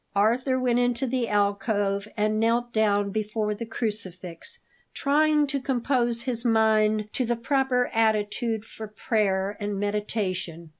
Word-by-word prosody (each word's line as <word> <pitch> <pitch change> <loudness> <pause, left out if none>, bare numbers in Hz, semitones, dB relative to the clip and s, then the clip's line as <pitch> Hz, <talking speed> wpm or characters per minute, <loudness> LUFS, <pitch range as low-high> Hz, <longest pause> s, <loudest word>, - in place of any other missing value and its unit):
Arthur 250 +6 +2
went 245 -1 +2
into 245 +1 +1
the 250 -1 -1
alcove 200 0 0
and 215 0 +1
knelt 235 +1 +1
down 205 -2 +2
before 215 0 -1
the 225 +2 -6
crucifix, 210 - -5 0.4
trying 300 +1 +3
to 280 -1 -3
compose 240 -2 0
his 245 -3 -3
mind 215 -2 +3
to 260 - 0
the 240 0 0
proper 250 +1 +1
attitude 220 0 0
for 220 -1 -8
prayer 205 -2 0
and 205 -1 -3
meditation. 195 -5 -3
220 Hz, 135 wpm, -26 LUFS, 205-245 Hz, 0.4 s, trying